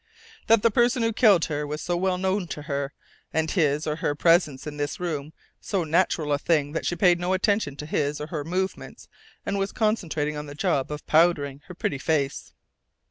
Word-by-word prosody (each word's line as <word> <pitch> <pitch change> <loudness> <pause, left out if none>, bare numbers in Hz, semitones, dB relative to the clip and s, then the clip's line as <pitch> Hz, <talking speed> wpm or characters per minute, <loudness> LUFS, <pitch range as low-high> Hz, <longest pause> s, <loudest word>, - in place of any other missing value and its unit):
"That 225 -2 +5
the 230 - +4
person 240 +2 +2
who 225 0 +1
killed 205 -7 +5
her 150 -1 -3
was 150 +1 -4
so 175 +2 -2
well 185 +1 0
known 190 0 -1
to 150 - -6
her, 140 -2 -3 0.4
and 160 0 0
his 150 -4 +1
or 150 0 -2
her 145 -2 -1
presence 165 -4 +3
in 150 -1 -6
this 145 -1 -3
room 155 -4 -3 0.3
so 195 -4 -1
natural 160 -2 +1
a 145 - +1
thing 145 -2 +1
that 165 - -3
she 175 - 0
paid 175 -1 +4
no 180 +1 0
attention 190 -6 +1
to 150 - -7
his 150 -1 -1
or 150 - -4
her 155 -2 -4
movements 185 +4 -4 0.4
and 200 0 -1
was 195 0 -1
concentrating 170 -9 -1
on 150 0 -6
the 145 - -9
job 150 -5 0
of 150 0 -6
powdering 155 -4 +2
her 180 - -10
very - - -45
pretty 140 - -1
face." 140 -2 -1
160 Hz, 210 wpm, -25 LUFS, 150-185 Hz, 0.4 s, That